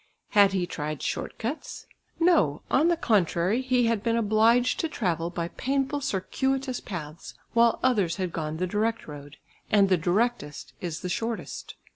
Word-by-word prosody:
Had 200 Hz, -2 st, +5 dB
he 185 Hz, -2 st, 0 dB
tried 155 Hz, -3 st, -5 dB
short -, -, -3 dB
cuts? 245 Hz, +8 st, -5 dB, 0.3 s
No, 325 Hz, -, +3 dB
on 300 Hz, +5 st, +4 dB
the 345 Hz, -1 st, +2 dB
contrary, 200 Hz, -, +1 dB
he 255 Hz, -2 st, +2 dB
had 230 Hz, -3 st, +1 dB
been 230 Hz, +1 st, 0 dB
obliged 230 Hz, +3 st, +3 dB
to 325 Hz, -, -1 dB
travel 175 Hz, -, -1 dB
by 170 Hz, -1 st, -4 dB
painful 275 Hz, +5 st, -1 dB
circuitous 265 Hz, +3 st, -1 dB
paths, 155 Hz, -4 st, -8 dB, 0.2 s
while 235 Hz, 0 st, +4 dB
others 205 Hz, -10 st, +2 dB
had 185 Hz, -2 st, -3 dB
gone 155 Hz, -1 st, -3 dB
the 180 Hz, -, 0 dB
direct 220 Hz, +5 st, -1 dB
road, 145 Hz, -1 st, -10 dB, 0.3 s
and 200 Hz, -2 st, +4 dB
the 185 Hz, -, +4 dB
directest 175 Hz, -2 st, -1 dB
is 170 Hz, -3 st, -4 dB
the -, -, -4 dB
shortest. 225 Hz, +5 st, -4 dB
210 Hz, 160 wpm, -26 LUFS, 170-245 Hz, 0.3 s, Had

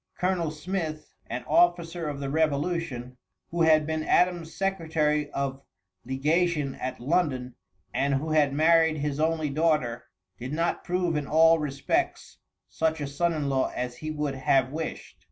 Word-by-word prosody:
Colonel 180 Hz, -3 st, 0 dB
Smith, 155 Hz, 0 st, -4 dB
an 120 Hz, +2 st, -4 dB
officer 175 Hz, -2 st, +2 dB
of 145 Hz, -1 st, -5 dB
the 140 Hz, -1 st, -3 dB
revolution, 145 Hz, -4 st, -1 dB, 0.3 s
who 170 Hz, 0 st, -1 dB
had 155 Hz, -2 st, +5 dB
been 160 Hz, 0 st, -2 dB
Adams' 175 Hz, -2 st, +2 dB
secretary 160 Hz, -6 st, 0 dB
of 140 Hz, -1 st, -3 dB, 0.4 s
legation 150 Hz, +2 st, +1 dB
at 130 Hz, -, -5 dB
London 130 Hz, -3 st, 0 dB, 0.4 s
and 140 Hz, 0 st, +1 dB
who 155 Hz, +4 st, -2 dB
had 150 Hz, -3 st, +3 dB
married 160 Hz, +2 st, +4 dB
his 145 Hz, 0 st, -2 dB
only 155 Hz, -2 st, 0 dB
daughter, 150 Hz, -6 st, 0 dB, 0.3 s
did 130 Hz, +4 st, -5 dB
not 165 Hz, +2 st, -1 dB
prove 180 Hz, -2 st, 0 dB
in 150 Hz, -2 st, -2 dB
all 165 Hz, +1 st, +5 dB
respects 140 Hz, -2 st, -2 dB, 0.3 s
such 160 Hz, 0 st, -1 dB
a 145 Hz, -, -2 dB
son 150 Hz, +5 st, 0 dB
in 150 Hz, -3 st, -2 dB
law 135 Hz, -1 st, +1 dB
as 125 Hz, 0 st, -3 dB
he 155 Hz, -, -5 dB
would 150 Hz, -2 st, -2 dB
have 130 Hz, -1 st, +2 dB
wished. 160 Hz, +2 st, -6 dB
155 Hz, 155 wpm, -27 LUFS, 140-165 Hz, 0.4 s, had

